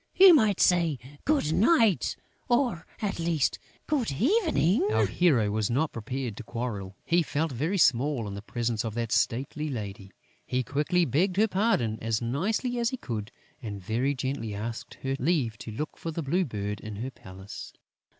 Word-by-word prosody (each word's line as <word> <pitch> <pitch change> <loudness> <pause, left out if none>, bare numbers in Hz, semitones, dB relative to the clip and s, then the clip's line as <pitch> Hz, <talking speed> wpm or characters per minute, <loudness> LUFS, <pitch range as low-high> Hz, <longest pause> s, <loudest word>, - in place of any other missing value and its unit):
You 375 -1 +9
might 215 - +4
say, 170 -5 +3 0.3
Good 280 - +2
night, 225 - +3 0.3
or, 240 -9 +1 0.2
at 200 -4 -1
least, 165 -4 +1 0.3
Good 265 - 0
evening!" 285 - +2
Our - - +3
hero 130 -13 +2
was 105 -1 0
not 145 +6 +1
prepared 120 0 -4
to 125 - -6
quarrel. 105 -5 -4
He 175 +1 +3
felt 160 0 -1
very 155 +11 -1
small 130 - +3
in 100 - -5
the 100 - -6
presence 115 0 -2
of 110 -2 -4
that 115 -2 -2
stately 130 +6 0
lady. 100 -5 -6 0.3
He 125 0 -1
quickly 150 +8 +1
begged 175 +8 +1
her 220 +2 +5
pardon, 185 - +1
as 115 -1 0
nicely 205 - -1
as 235 -1 +2
he 260 - -4
could; 110 - -5 0.3
and 105 -4 -5
very 120 +9 0
gently 130 -5 -3
asked 110 +3 -5
her 135 0 0
leave 135 -6 +1
to 110 - -7
look 150 +9 -4
for 165 - -5
the 165 0 -3
Blue 175 +7 +1
Bird 105 -5 -4
in 110 0 -7
her 125 +6 -4
palace. 95 -3 -10
135 Hz, 175 wpm, -28 LUFS, 115-180 Hz, 0.3 s, You